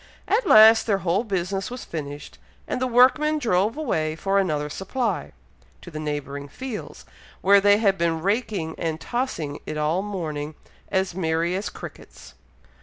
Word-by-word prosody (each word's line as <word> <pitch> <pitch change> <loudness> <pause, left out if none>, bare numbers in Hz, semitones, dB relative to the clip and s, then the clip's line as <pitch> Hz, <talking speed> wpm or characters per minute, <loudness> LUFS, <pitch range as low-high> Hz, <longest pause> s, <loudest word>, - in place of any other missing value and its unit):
At 430 0 +1
last 220 +1 +8
their 200 -3 +2
whole 180 +6 +2
business 195 -2 -2
was 250 +1 -7
finished, 145 -2 -7 0.3
and - - -3
the 255 - +1
workmen 265 +6 +4
drove 220 -2 +1
away 160 - -1
for 195 +4 +1
another 150 -6 0
supply, 225 - -3 0.5
to 175 - -10
the 155 - -6
neighbouring 145 -2 -4
fields, 245 - -7 0.4
where 200 +1 +6
they 205 +1 +5
had 200 -4 +2
been 165 -1 0
raking 200 -5 -1
and 160 -1 -2
tossing 170 - -3
it 155 - -4
all 155 +4 +1
morning, 155 -7 -4 0.3
as 190 -2 0
merry 170 0 0
as 195 +2 -3
crickets. - - -11
190 Hz, 155 wpm, -24 LUFS, 160-220 Hz, 0.5 s, last